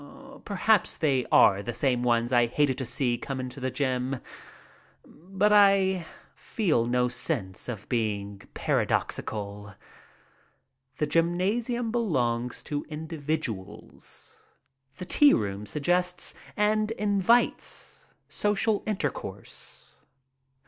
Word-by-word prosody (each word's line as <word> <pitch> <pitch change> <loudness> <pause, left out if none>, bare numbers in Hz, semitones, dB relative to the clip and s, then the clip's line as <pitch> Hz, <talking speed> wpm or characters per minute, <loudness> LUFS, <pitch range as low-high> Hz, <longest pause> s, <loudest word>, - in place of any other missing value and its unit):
Perhaps 210 0 +2
they 135 -5 +1
are 100 0 +6
the 115 +3 -5
same 125 -3 +1
ones 120 0 +1
I 120 -1 +5
hated 135 +2 +1
to 130 - -2
see 120 -1 0
come 135 0 -4
into 130 +1 -6
the 130 0 -1
gym, 130 0 -1 0.9
but 195 +6 -1
I 195 -4 +4 0.3
feel 155 - 0
no 125 0 +2
sense 120 - -3
of 110 -4 -6
being 100 -4 -2
paradoxical. 105 -1 -2 1.2
The 150 - +1
gymnasium 200 - 0
belongs 125 - 0
to 145 -1 -3
individuals. 150 - -5 0.6
The 180 - -6
tea 290 +10 +5
room 100 -1 -3
suggests 180 - -1 0.2
and 215 +1 +2
invites 210 +2 +1 0.2
social 210 +1 0
inter 215 -3 0
course. - - -9
145 Hz, 105 wpm, -27 LUFS, 120-195 Hz, 1.2 s, are